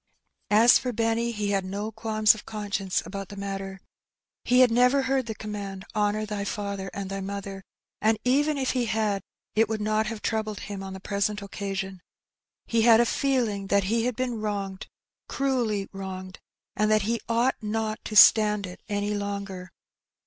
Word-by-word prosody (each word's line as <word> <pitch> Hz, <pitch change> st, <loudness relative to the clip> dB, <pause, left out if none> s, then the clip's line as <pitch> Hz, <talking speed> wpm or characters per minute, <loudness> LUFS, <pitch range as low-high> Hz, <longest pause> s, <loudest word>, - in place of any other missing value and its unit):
As 225 Hz, +3 st, +7 dB
for 250 Hz, -, -3 dB
Benny, 230 Hz, +1 st, 0 dB
he 210 Hz, -2 st, -2 dB
had 195 Hz, -1 st, +1 dB
no 200 Hz, +3 st, -4 dB
qualms 215 Hz, -1 st, +3 dB
of 215 Hz, -, -10 dB
conscience 205 Hz, -3 st, -2 dB
about 195 Hz, -1 st, -6 dB
the 200 Hz, -, -8 dB
matter. 195 Hz, -1 st, -5 dB, 0.6 s
He 250 Hz, +1 st, +4 dB
had 250 Hz, -2 st, +6 dB
never 250 Hz, +3 st, +4 dB
heard 265 Hz, -2 st, 0 dB
the 220 Hz, -, -4 dB
command, 200 Hz, -3 st, -6 dB
"Honour 210 Hz, 0 st, +1 dB
thy 210 Hz, -1 st, -3 dB
father 200 Hz, -1 st, -4 dB
and 200 Hz, -1 st, -5 dB
thy 195 Hz, 0 st, -4 dB
mother,^' 195 Hz, 0 st, -5 dB, 0.4 s
and 220 Hz, +1 st, +3 dB
even 290 Hz, +4 st, +2 dB
if 265 Hz, -2 st, 0 dB
he 250 Hz, -2 st, 0 dB
had, 215 Hz, -3 st, 0 dB, 0.3 s
it 220 Hz, 0 st, +3 dB
would 220 Hz, -1 st, -1 dB
not 215 Hz, +1 st, 0 dB
have 220 Hz, -1 st, -5 dB
troubled 215 Hz, -2 st, -2 dB
him 200 Hz, -2 st, -6 dB
on 190 Hz, 0 st, -6 dB
the 190 Hz, -, -7 dB
present 200 Hz, +1 st, -1 dB
occasion. 195 Hz, -2 st, -5 dB, 0.6 s
He 230 Hz, -1 st, +1 dB
had 230 Hz, 0 st, +7 dB
a 240 Hz, -, +5 dB
feeling 235 Hz, -7 st, 0 dB
that 200 Hz, 0 st, +3 dB
he 225 Hz, +4 st, 0 dB
had 250 Hz, -2 st, -1 dB
been 245 Hz, -3 st, -2 dB
wronged, 200 Hz, -2 st, -3 dB, 0.4 s
cruelly 240 Hz, -8 st, 0 dB
wronged, 185 Hz, -1 st, -7 dB, 0.4 s
and 215 Hz, 0 st, +2 dB
that 215 Hz, -1 st, +3 dB
he 230 Hz, +3 st, -1 dB
ought 235 Hz, +3 st, +1 dB
not 220 Hz, 0 st, -2 dB
to 215 Hz, -, -5 dB
stand 210 Hz, -1 st, +7 dB
it 180 Hz, 0 st, -10 dB
any 205 Hz, 0 st, -1 dB
longer. 200 Hz, -2 st, -4 dB
210 Hz, 180 wpm, -26 LUFS, 200-225 Hz, 0.6 s, As